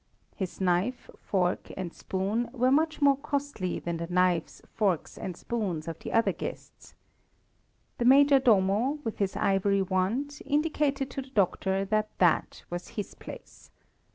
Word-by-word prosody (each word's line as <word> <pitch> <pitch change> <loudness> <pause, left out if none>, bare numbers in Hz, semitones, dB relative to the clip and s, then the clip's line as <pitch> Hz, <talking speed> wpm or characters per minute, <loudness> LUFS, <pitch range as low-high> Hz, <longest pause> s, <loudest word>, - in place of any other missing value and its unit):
His 190 -3 -5
knife, 190 +7 0 0.2
spoon, 180 -2 +1 0.2
and 180 -3 -4
fork 210 +6 -2
were 255 +1 +3
much 310 +1 +2
more 280 -1 +5
costly 280 -10 -3
than 170 -1 -3
the 170 0 -4
knives, 180 -1 +1 0.2
spoons, 195 -7 0
and 180 -2 -6
forks 190 -10 -3
of 165 -1 -5
the - - -6
other 225 - +3
guests. - - -8 1.0
The 240 - +1
Major 280 +2 +7
Domo, 225 +3 +3
with 225 - -4
his 195 -2 0
ivory 200 -1 +2
wand, 205 +11 -1
indicated 290 -2 0
to 275 - -4
the 265 - -12
doctor 195 -3 +1
that 215 +1 0
that 175 -3 +2
was 175 0 -4
his 205 - -4
place. - - -12
205 Hz, 150 wpm, -28 LUFS, 185-265 Hz, 1.0 s, Major